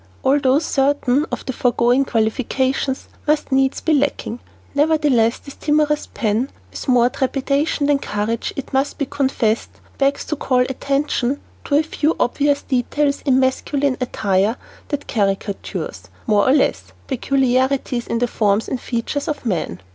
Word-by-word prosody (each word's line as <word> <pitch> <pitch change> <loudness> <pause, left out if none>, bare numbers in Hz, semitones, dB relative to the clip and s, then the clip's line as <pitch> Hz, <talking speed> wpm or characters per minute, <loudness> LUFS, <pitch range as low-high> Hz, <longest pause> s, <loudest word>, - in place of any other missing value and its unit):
Although 270 0 +3
certain 285 -1 +1
of - - -4
the 260 - -3
foregoing 245 +2 +2
qualifications 260 +4 0 0.2
must 300 -1 +1
needs 265 0 +2
be 320 - +1
lacking, 280 -4 0 0.3
nevertheless 285 -6 +3
this 280 - -12
timorous 300 0 +1
pen, 225 +4 0 0.2
with - - -7
more 245 -2 +5
trepidation 275 +3 0
than 285 -1 +3
courage 215 0 -2
it 275 - -6
must 270 +2 0
be 280 - -1
confessed, 260 -5 0 0.3
begs 275 0 +1
to 305 - -2
call 255 -3 +1
attention 275 +1 0 0.3
to 285 - +1
a 300 - +4
few 315 0 0
obvious 285 +3 +1
details 280 +3 0
in 260 -1 +4
masculine 270 +1 +1
attire 205 -3 +1 0.3
that 290 -1 -3
caricature, 200 -2 -2 0.3
more 210 0 +3
or - - +5
less, 295 - +1
peculiarities 260 -1 0
in 230 - -1
the 245 +1 +1
forms 210 -2 +1
and 255 - -3
features 250 +4 -3
of 295 -4 -3
men. 165 - -2
265 Hz, 145 wpm, -20 LUFS, 240-285 Hz, 0.3 s, more